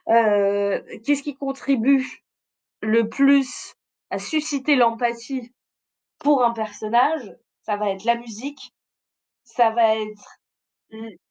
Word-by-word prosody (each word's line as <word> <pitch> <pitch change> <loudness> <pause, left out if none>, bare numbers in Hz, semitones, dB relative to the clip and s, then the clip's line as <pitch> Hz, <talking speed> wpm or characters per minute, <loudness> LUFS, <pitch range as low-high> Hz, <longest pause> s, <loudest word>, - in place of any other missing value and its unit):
heu, 200 -3 +3 0.2
qu'est-ce 290 +1 +1
qui 290 -1 -6
contribue 270 -1 +1 0.8
le 220 +1 +2
plus 275 0 +2 0.4
à - - -3
susciter 295 -2 0
l'empathie 235 +1 0 0.7
pour 285 -3 +3
un 235 - +4
personnage? 230 +4 -1 0.3
Ça 210 -2 -2
va 210 -1 -1
être 195 +1 -8
la 235 - +3
musique. 240 +4 -10 0.7
Ça 235 -3 +2
va 225 -1 +3
être 215 -1 -9 0.5
l 220 -3 -12
235 Hz, 110 wpm, -22 LUFS, 220-275 Hz, 0.8 s, un